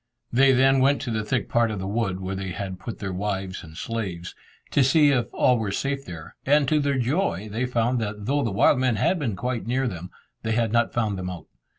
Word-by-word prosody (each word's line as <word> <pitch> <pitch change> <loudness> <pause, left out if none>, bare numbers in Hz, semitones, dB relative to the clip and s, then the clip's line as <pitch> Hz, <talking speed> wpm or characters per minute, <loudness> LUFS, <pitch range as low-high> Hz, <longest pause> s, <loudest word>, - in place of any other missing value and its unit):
They 135 +2 +6
then 135 +1 +4
went 140 +2 +3
to 125 - -3
the 110 -1 -1
thick 120 +1 -1
part 120 -1 +2
of 105 - -3
the 95 - -4
wood, 100 -2 -1
where 95 +1 -3
they 95 -1 -4
had 95 -1 -5
put 115 +4 -6
their 95 -2 -4
wives 95 -1 -3
and 80 -1 -12
slaves, 95 -7 -4 0.4
to 140 - +4
see 145 +2 +5
if 120 -4 +1
all 125 -2 +3
were 105 -3 -2
safe 140 +6 -2
there, 80 -3 -9
and 145 0 +3
to 155 - +3
their 140 -1 0
joy 130 - 0
they 120 +4 -1
found 120 0 +1
that 105 -1 -4
though 145 +4 +1
the 115 - 0
wild 100 +5 +3
men 130 -3 +2
had 175 - +1
been 120 -9 -2
quite 120 +3 -3
near 130 +2 +1
them, 90 -4 -6 0.3
they 110 - -1
had 115 -1 +1
not 115 0 +2
found 105 -5 -1
them 90 0 -4
out. 90 -3 -7
115 Hz, 240 wpm, -25 LUFS, 95-130 Hz, 0.4 s, They